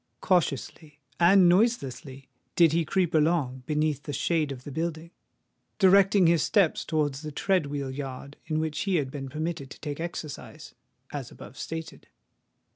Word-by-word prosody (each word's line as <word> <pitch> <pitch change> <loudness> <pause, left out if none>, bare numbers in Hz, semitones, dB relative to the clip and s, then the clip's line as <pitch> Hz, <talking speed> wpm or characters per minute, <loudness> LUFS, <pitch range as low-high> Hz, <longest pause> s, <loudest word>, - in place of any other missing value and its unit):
Cautiously 155 -3 -1 0.2
and 180 +1 +6
noiselessly 145 - 0 0.3
did 170 -3 +5
he 165 +1 +2
creep 180 +1 0
along, 150 -5 +1
beneath 150 -2 0
the 145 - -6
shade 155 -1 0
of 130 -2 -8
the 145 - -8
building—directing 180 +4 +1
his 165 -1 +4
steps 195 -3 +2
towards 150 -3 -1
the 155 -1 -6
tread 180 +1 +1
wheel 140 -2 -4
yard 135 +1 -7
in 155 -1 0
which 155 -1 -2
he 195 -2 0
had 140 -5 0
been 135 -2 -6
permitted 155 -1 -4
to - - -12
take 145 -1 -5
exercise, 165 -3 -7 0.4
as - - -5
above - - -12
stated. 165 0 -7
155 Hz, 150 wpm, -27 LUFS, 145-170 Hz, 0.4 s, and